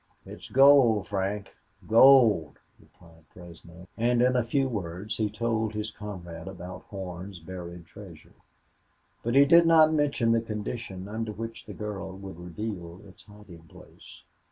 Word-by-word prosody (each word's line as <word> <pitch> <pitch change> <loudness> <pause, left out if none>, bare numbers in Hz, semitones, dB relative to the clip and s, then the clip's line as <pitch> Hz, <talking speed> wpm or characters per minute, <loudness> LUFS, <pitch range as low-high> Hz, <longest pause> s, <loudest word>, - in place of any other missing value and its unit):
"It's - - -11
gold, 135 -6 +5
Frank 100 0 -3 0.3
gold," 115 - +5 0.2
replied 80 -2 -21
Fresno; 85 0 -14
and 120 +1 +1
in 125 -1 +2
few 135 +3 0
words 100 -2 -5
he 110 -2 0
told 110 0 -2
his 105 0 -4
comrade 90 -5 -9
about 90 -1 -8
Horn's 95 -1 -7
buried 85 0 -9
treasure. 85 -6 -14 0.9
But 120 +2 -2
he 140 +1 +7
did 170 +3 +6
not 160 -1 +6
mention 140 -6 +1
the 115 0 +2
condition 105 -3 -6
under 110 +1 -4
which 115 +2 -8
the - - -9
girl 100 -3 -6
would 95 -3 -10
reveal 90 0 -7
its 95 - -17
hiding 105 -6 -15
place. - - -16
105 Hz, 140 wpm, -27 LUFS, 90-115 Hz, 0.9 s, he